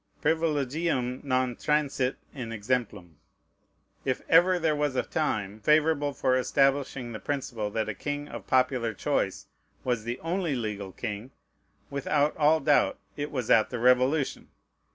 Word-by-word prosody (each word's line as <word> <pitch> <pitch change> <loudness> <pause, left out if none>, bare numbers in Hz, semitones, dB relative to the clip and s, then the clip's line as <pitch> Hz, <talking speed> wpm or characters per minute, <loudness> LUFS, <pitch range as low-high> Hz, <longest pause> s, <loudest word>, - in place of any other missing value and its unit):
Privilegium 150 -4 0
non 130 -2 0
transit 140 -3 0 0.2
in 125 -5 -6
exemplum. 105 - -3 0.8
If 130 -2 -1
ever 180 +3 +5
there 160 -3 +1
was 145 -2 0
a - - +1
time 110 -9 -2
favorable 150 +3 +3
for 130 -1 +1
establishing 135 -1 +1
the 110 - -6
principle 120 -4 -3
that 110 +1 -2
a 110 - -2
king 145 +7 -4
of - - -9
popular 125 -3 +1
choice - - -1 0.4
was 120 -4 -1
the 120 +3 -4
only 170 -2 -1
legal 105 -5 -4
king, 110 +3 -5 0.6
without 145 +1 +1
all 155 +1 +4
doubt 145 0 +3 0.2
it 145 0 -3
was 130 -6 -2
at 110 - +5
the 125 - -4
Revolution. 125 +4 +2
130 Hz, 140 wpm, -28 LUFS, 115-150 Hz, 0.8 s, ever